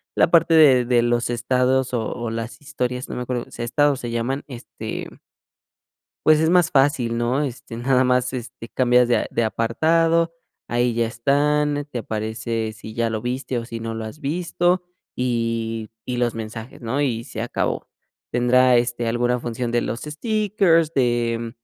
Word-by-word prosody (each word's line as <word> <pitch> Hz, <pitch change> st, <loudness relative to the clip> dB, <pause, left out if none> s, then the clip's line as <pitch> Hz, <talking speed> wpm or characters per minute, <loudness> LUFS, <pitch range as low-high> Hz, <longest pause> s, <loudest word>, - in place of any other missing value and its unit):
la -, -, +3 dB
parte 165 Hz, -1 st, +5 dB
de 135 Hz, -6 st, +6 dB
de 120 Hz, -1 st, +3 dB
los 120 Hz, 0 st, +1 dB
estados 125 Hz, +2 st, +1 dB
o 115 Hz, -3 st, -1 dB
o 120 Hz, -2 st, -4 dB
las 115 Hz, +6 st, -5 dB
historias, 125 Hz, -2 st, -3 dB
no -, -, -5 dB
me -, -, -3 dB
acuerdo 125 Hz, -1 st, -3 dB
si -, -, -8 dB
estados 140 Hz, +3 st, +2 dB
se 120 Hz, -, -5 dB
llaman, 120 Hz, +4 st, -2 dB
este 125 Hz, -3 st, -7 dB, 1.2 s
pues 155 Hz, -1 st, +6 dB
es 160 Hz, +1 st, +3 dB
más 175 Hz, -1 st, +4 dB
fácil, 135 Hz, -4 st, +2 dB
¿no? 120 Hz, +4 st, +1 dB
Este, 120 Hz, -4 st, -6 dB
nada 130 Hz, +2 st, +2 dB
más, 125 Hz, 0 st, +1 dB
este, 120 Hz, -1 st, -7 dB
cambias 125 Hz, -1 st, +3 dB
de 120 Hz, -, +3 dB
a -, -, -2 dB
de 115 Hz, -, +1 dB
apartado, 165 Hz, +9 st, +2 dB, 0.3 s
ahí 120 Hz, 0 st, +1 dB
ya 115 Hz, 0 st, +1 dB
están, 145 Hz, +4 st, +1 dB
te 120 Hz, -, -3 dB
aparece 110 Hz, 0 st, -3 dB
si 110 Hz, 0 st, -10 dB
ya 115 Hz, 0 st, 0 dB
lo 110 Hz, -1 st, -3 dB
viste 125 Hz, +1 st, -3 dB
o 115 Hz, -, -3 dB
si 115 Hz, -1 st, -6 dB
no 115 Hz, 0 st, -4 dB
lo 110 Hz, -, -4 dB
has 110 Hz, +8 st, -9 dB
visto 175 Hz, +4 st, 0 dB, 0.3 s
y 115 Hz, -3 st, -2 dB, 0.2 s
y 125 Hz, -1 st, -3 dB
los 120 Hz, -1 st, 0 dB
mensajes, 115 Hz, +2 st, -7 dB
¿no?, 125 Hz, +5 st, -1 dB
y 115 Hz, -5 st, 0 dB
se 110 Hz, -4 st, -6 dB
acabó. 120 Hz, -, -2 dB, 0.4 s
Tendrá, 125 Hz, +1 st, +4 dB
este, 120 Hz, 0 st, -1 dB
alguna 120 Hz, +1 st, +1 dB
función 120 Hz, 0 st, -3 dB
de 120 Hz, 0 st, +2 dB
los 115 Hz, -, -3 dB
stickers, 185 Hz, -1 st, +1 dB
de, 120 Hz, -2 st, +1 dB
mm, 115 Hz, 0 st, -5 dB
125 Hz, 175 wpm, -22 LUFS, 115-140 Hz, 1.2 s, de